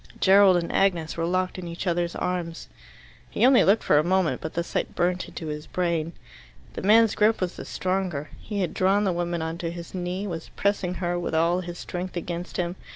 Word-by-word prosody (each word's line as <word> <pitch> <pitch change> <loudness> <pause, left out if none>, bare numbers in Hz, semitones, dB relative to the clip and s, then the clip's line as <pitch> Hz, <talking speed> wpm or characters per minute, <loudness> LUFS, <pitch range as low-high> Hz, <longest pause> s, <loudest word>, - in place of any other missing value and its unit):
Gerald 195 -1 +6
and 170 -1 -2
Agnes 175 -5 +1
were 165 0 -1
locked 185 +1 -1
in 175 - -6
each 170 +3 -6
other's 175 -1 0
arms. 175 -2 -3 0.6
He - - +2
only 260 -1 +6
looked 200 +4 +3
for 150 - +4
a - - +2
moment, 185 0 +1
but 160 - -6
the 170 - 0
sight - - -3
burnt 180 +1 0
into 165 - -8
his 150 0 -5
brain. 170 -2 -1 0.6
The - - -5
man's 220 +2 +5
grip 220 +1 +3
was 185 -1 -2
the - - -8
stronger. 185 -6 -2
He 205 -2 -4
had 180 - -1
drawn 195 +2 +2
the 190 -3 +1
woman 175 -1 -2
on 160 +1 -4
to 170 - -2
his 170 0 -8
knee, 180 +2 -3
was 165 -4 -5
pressing 200 -3 0
her, 175 -1 -1
with 175 - -3
all 170 +3 +2
his 175 -1 -6
strength, 180 0 -5
against 175 +1 -5
him. 175 +1 -2
175 Hz, 215 wpm, -25 LUFS, 170-190 Hz, 0.6 s, Gerald